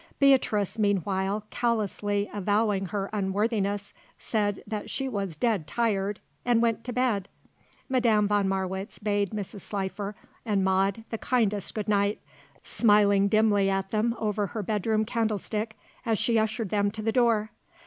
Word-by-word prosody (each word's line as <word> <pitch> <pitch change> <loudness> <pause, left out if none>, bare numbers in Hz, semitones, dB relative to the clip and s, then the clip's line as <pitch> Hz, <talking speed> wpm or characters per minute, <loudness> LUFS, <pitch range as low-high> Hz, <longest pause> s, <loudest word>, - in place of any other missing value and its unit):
Beatrice 230 -7 +3
meanwhile, 200 0 0
callously 205 -3 0
avowing 205 -1 +1
her 195 +1 -2
unworthiness, 200 0 -1 0.2
said 205 -3 -1
that 215 -2 -5
she 270 - -2
was 200 -8 -3
"dead 200 -3 0
tired" 205 -1 0 0.2
and 240 -2 +3
went 230 -1 +1
to 250 - -3
bed. 235 -6 0 0.6
Madame 230 -5 +3
von 205 -1 +2
Marwitz 190 0 -3
bade 205 -2 0
Mrs. 205 -1 -5
Slifer 200 +1 -4 0.3
and 205 -4 +1
Maude 195 +3 +1
the 225 - -3
kindest 210 -6 0
good 215 -1 -3
night, 205 0 +2 0.4
smiling 205 -3 +4
dimly 205 -2 +3
at 195 0 -1
them 225 +2 +1
over 210 -2 -1
her 215 +1 -4
bedroom 215 +2 0
candlestick 220 0 -2 0.3
as 225 -3 +1
she 230 +1 +2
ushered 220 -1 -1
them 205 0 +2
to 215 +1 -6
the 225 - +1
door. 225 -3 +2
210 Hz, 145 wpm, -27 LUFS, 200-225 Hz, 0.6 s, smiling